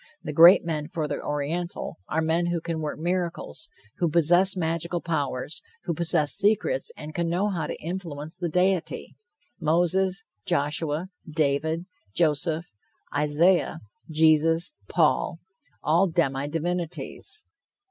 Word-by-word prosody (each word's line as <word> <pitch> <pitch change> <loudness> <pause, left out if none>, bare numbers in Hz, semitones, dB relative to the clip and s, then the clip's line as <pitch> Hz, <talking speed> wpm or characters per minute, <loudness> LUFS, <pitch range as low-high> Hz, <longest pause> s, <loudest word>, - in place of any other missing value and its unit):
The 150 - -4
great 170 +4 +8
men 155 -3 -2
for 160 -3 -3
the - - -3
Oriental 155 +5 -3
are 160 +1 +1
men 165 +2 +1
who 175 0 0
can 165 -1 -3
work 150 -1 -3
miracles, 175 - -3 0.3
who 170 - +2
possess 175 +4 +3
magical 170 +1 -1
powers, 145 -4 -2 0.2
who 170 - -1
possess 165 -3 +1
secrets 220 - +2
and 155 - -7
can 170 0 -1
know 185 +5 +1
how 165 -6 -2
to - - -5
influence 165 -3 -5
the 175 -1 -3
deity, 180 +1 0 0.4
Moses, 175 +4 +1 0.2
Joshua, 150 +4 0 0.2
David, 155 +2 0 0.3
Joseph, 160 +1 +2 0.5
Isaiah, 155 +5 +3 0.3
Jesus, 160 +1 +3 0.2
Paul, 65 - +2 0.5
all 170 +5 +4
demi 140 -5 0
divinities. 175 - -3
165 Hz, 125 wpm, -26 LUFS, 155-175 Hz, 0.5 s, great